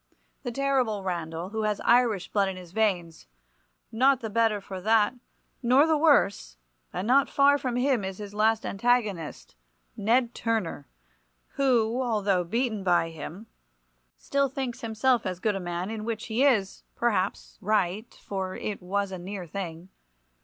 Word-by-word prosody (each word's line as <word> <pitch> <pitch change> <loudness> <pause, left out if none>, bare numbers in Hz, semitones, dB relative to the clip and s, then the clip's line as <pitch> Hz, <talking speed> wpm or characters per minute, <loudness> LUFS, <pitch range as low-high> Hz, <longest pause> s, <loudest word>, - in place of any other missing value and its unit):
The 245 - -4
terrible 255 -6 0
Randall, 170 -1 -4
who 220 +1 -3
has 210 -1 0
Irish 235 -6 +3
blood 200 -2 +2
in 190 - -6
his 180 -2 -11
veins; 180 - -1 0.6
not 260 +3 +3
the 225 -4 -5
better 225 -1 +2
for 190 -1 -8
that, 220 +2 +3 0.5
nor 260 +4 +5
the 320 -1 +3
worse; 205 - +2 0.3
and 180 +2 -3
not 270 +3 +4
far 285 +1 +4
from 255 -3 -2
him 250 -3 +1
is 190 0 -5
his 205 -1 -8
last 220 +1 +2
antagonist, 195 - -1 0.4
Ned 235 +3 +2
Turner, 220 -11 -2 0.6
who, 245 -3 +1 0.2
though 190 -3 +2
beaten 220 +2 -1
by 175 -3 +2
him, 165 +6 -8 0.7
still 280 -1 0
thinks 260 -2 -4
himself 230 +2 +1
as 185 -1 -4
good 210 +1 0
a - - -2
man, 175 +2 -4
in 220 -1 -5
which 225 -1 -4
he 230 +4 0
is, 220 -9 +2
perhaps, 205 -5 -1
right, 210 +1 0
for 190 -2 -5
it 210 -2 -4
was 195 +2 -2
a 185 - -5
near 185 +1 -6
thing. 170 0 -6
215 Hz, 155 wpm, -27 LUFS, 185-240 Hz, 0.7 s, nor